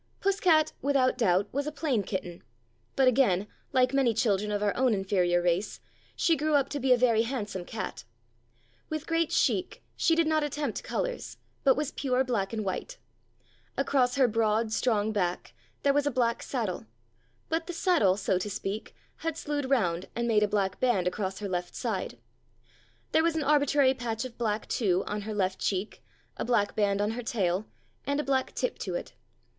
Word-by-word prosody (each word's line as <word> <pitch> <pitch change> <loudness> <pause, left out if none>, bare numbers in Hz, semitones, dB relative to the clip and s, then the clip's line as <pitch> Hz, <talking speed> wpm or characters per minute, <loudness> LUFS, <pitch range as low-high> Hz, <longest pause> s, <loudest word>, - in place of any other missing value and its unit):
Puss 395 0 +1
cat, 315 -5 +4
without 275 -2 +2
doubt, 200 -5 +2
was 285 +2 -2
a - - -2
plain 285 -7 0
kitten; 185 -3 -5 0.5
but 265 -1 +4
again, 225 -7 +3 0.3
like 255 -1 +3
many 260 -5 +3
children 210 -2 +1
of 205 0 -1
our 205 - +1
own 250 -3 +3
inferior 180 -3 +1
race, 175 +3 0 0.4
she 330 - +3
grew 305 0 +1
up 275 -1 +2
to 290 - -3
be 260 0 +1
a 250 - +7
very 235 -3 +3
handsome 215 -6 -3
cat. 220 - -5 0.9
With 310 0 -3
great 330 -1 0
chic 365 -1 0
she 330 - +3
did 335 0 +3
not 310 -1 +2
attempt 295 0 -3
colours, - - -3 0.3
but 265 -2 +4
was 300 -1 -1
pure 260 -2 0
black 220 -7 -1
and 220 -2 -3
white. 350 - -4 0.8
Across 265 -2 +2
her 265 -2 +4
broad, 220 0 +1
strong 220 -3 +1
back 180 -4 -2 0.3
there 280 - +4
was 290 0 +2
a - - +4
black 235 -3 0
saddle, 215 - -3 0.6
but 325 +1 -1
the - - -3
saddle, 330 - +3
so 190 -2 0
to 210 - -3
speak, 200 +2 -5 0.2
had 325 -1 -3
slewed 290 -4 -3
round 180 -10 +1
and 235 0 -1
made 215 -2 +3
a 210 - +3
black 200 -2 -1
band 240 -8 +2
across 190 +1 -2
her 205 - -4
left 180 -2 -3
side. 205 - -3 0.9
There - - +4
was 330 0 +1
an 315 - 0
arbitrary 285 -2 +4
patch 235 -2 -3
of 245 -2 -8
black, 215 -2 -1
too, 190 -5 +1
on 210 0 -3
her - - -2
left 190 -2 0
cheek, 195 +2 -2 0.3
a - - -2
black 235 -4 +1
band 200 -1 +1
on 210 +1 +1
her 240 +2 -4
tail, 200 -4 -1 0.4
and 285 +1 0
a - - 0
black 265 -2 0
tip 250 - -2
to 185 -3 -3
it. - - -5
235 Hz, 190 wpm, -28 LUFS, 200-280 Hz, 0.9 s, a